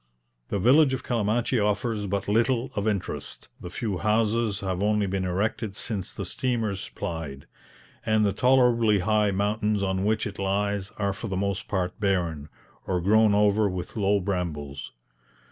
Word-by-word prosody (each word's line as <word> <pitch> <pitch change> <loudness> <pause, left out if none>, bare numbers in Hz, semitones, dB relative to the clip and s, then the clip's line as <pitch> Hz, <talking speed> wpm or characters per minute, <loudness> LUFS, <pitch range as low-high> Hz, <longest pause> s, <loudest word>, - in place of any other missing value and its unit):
The - - -2
village 130 +7 +5
of 130 - -7
Calamachi 115 +1 0
offers 105 0 0
but 100 +1 -2
little 120 +4 +1
of 105 +1 -1
interest, 100 -3 -3
the 90 - -7
few 100 -1 -3
houses 110 +1 +1
have 95 -1 -2
only 105 0 +2
been 95 -1 -2
erected 100 +3 -1
since 105 -3 -2
the - - -5
steamers 115 -6 -2
plied, 75 -5 -6 0.6
and 110 -1 +2
the 100 - +1
tolerably 125 -4 +4
high 105 +2 +2
mountains 105 +1 0
on 95 0 0
which 110 +1 +1
it 100 -1 -6
lies 100 0 -1
are 100 -1 0
for 100 +4 -6
the 95 -3 -3
most 100 0 -2
part 90 -3 -2
barren, 85 -7 -1 0.4
or 90 -1 0
grown 105 +3 +4
over 105 0 +3
with 90 -1 -5
low 100 -1 +2
brambles. 85 -8 -4
100 Hz, 160 wpm, -26 LUFS, 95-110 Hz, 0.6 s, village